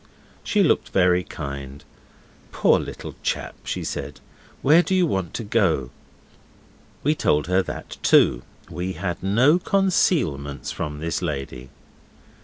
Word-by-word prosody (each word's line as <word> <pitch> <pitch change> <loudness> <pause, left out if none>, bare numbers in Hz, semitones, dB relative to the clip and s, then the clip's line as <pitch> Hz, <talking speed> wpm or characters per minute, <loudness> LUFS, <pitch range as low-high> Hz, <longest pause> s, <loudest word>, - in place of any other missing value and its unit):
She 205 -2 +2
looked 160 - +2
very 90 -1 +3
kind. 70 -3 -7 0.7
'Poor - - +3
little - - -7
chap,' - - -2
she - - -3
said. 75 +2 -5 0.4
'Where 155 +5 +6
do 190 +1 -1
you 185 -1 +4
want 95 - -2
to 115 - -3
go?' 95 - +1 1.1
We 150 - +3
told 75 - +1
her 90 +2 +2
that 90 - -7
too. - - +4 0.3
We 90 +2 -4
had 90 -2 -4
no 125 - +4
concealments 155 - 0
from 75 0 -5
this 85 +2 -2
lady. 70 -6 -5
90 Hz, 130 wpm, -23 LUFS, -, 1.1 s, Where